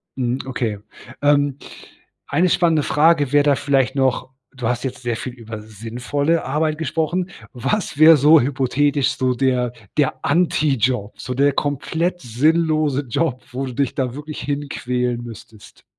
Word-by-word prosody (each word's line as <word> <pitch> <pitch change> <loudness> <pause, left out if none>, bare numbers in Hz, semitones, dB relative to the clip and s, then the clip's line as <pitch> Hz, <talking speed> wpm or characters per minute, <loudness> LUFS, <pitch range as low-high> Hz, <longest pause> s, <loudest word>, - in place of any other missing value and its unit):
Hm, 125 -1 -1
okay. 120 -5 -2 0.5
Ähm, 145 -1 +3 0.7
eine 180 +2 +2
spannende 165 -4 +2
Frage 150 -3 +3
wäre 145 0 +5
da 145 -1 +3
vielleicht 135 -1 +1
noch: 130 -2 0 0.3
Du 125 -3 -3
hast 125 0 -1
jetzt 130 -2 -5
sehr 120 -2 -2
viel 125 - -6
über 115 -3 -8
sinnvolle 120 +9 -2
Arbeit 155 +3 0
gesprochen. 165 +4 -2 0.2
Was 145 - -2
wäre 160 +2 +8
so 150 +3 +6
hypothetisch 140 +1 +1
so 130 -1 +1
der 125 -1 0 0.2
der 145 -3 0
Anti-Job 140 - +1
so 125 - -4
der 140 +2 +2
komplett 160 +6 -2
sinnlose 155 +3 +1
Job, 130 0 -1
wo 130 +2 -3
du 130 - -6
dich 140 +1 -1
da 125 -3 -1
wirklich 150 +2 -7
hinquälen 125 -4 -2
müsstest?" 110 -2 -13
135 Hz, 145 wpm, -20 LUFS, 125-150 Hz, 0.7 s, wäre